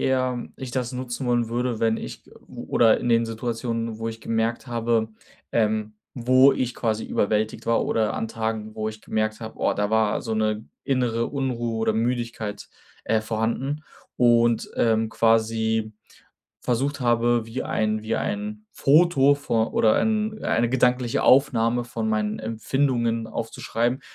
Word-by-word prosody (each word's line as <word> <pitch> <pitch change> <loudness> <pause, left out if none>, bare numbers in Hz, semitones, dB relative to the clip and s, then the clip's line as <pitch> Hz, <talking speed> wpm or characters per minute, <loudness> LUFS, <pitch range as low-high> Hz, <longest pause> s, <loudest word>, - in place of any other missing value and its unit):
eher 130 -2 0
ich 130 -2 -7
das 125 0 -2
nutzen 125 0 -4
wollen 120 -1 +1
würde, 120 0 -2
wenn 115 -1 +2
ich - - -8
g - - -21 0.2
oder 115 -2 +2
in - - -2
den 115 0 +3
Situationen, 115 0 -3
wo 115 0 -3
ich 115 0 -7
gemerkt 115 +2 -1
habe, 115 -2 0 0.4
ähm, 110 -1 0 0.2
wo 130 +2 +5
ich 125 -2 -2
quasi 110 -2 -1
überwältigt 105 +1 -1
war 115 0 +2
oder 110 -1 0
an 110 - -3
Tagen, 110 -1 -3
wo 110 0 -2
ich 110 0 -9
gemerkt 110 0 -2
habe: 110 -1 -8
„Oh, - - +1
da 105 +1 -1
war 110 -1 +2
so 115 - -4
'ne 110 0 0 0.2
innere 120 -4 0
Unruhe 125 -5 -2
oder 110 0 +1
Müdigkeit, 115 -2 -2 0.4
äh, 110 -1 +2
vorhanden“ 115 +7 -2 0.3
und, 120 -1 +3
ähm, 110 -1 +2
quasi 110 -1 +1 0.7
versucht 135 +4 -1
habe, 120 -1 +2
wie 115 +3 -4
ein 110 0 -1
wie 110 +1 -2
ein 210 +1 -4
Foto 145 -2 +4
vor 115 -6 -1
oder 110 -1 +4
ein 215 0 0
eine 115 +1 +2
gedankliche 125 -1 +1
Aufnahme 120 -3 +4
von 115 -2 -3
meinen 105 0 -1
Empfindungen 115 +1 0
aufzuschreiben, 115 +3 -2
115 Hz, 150 wpm, -24 LUFS, 110-125 Hz, 0.7 s, wo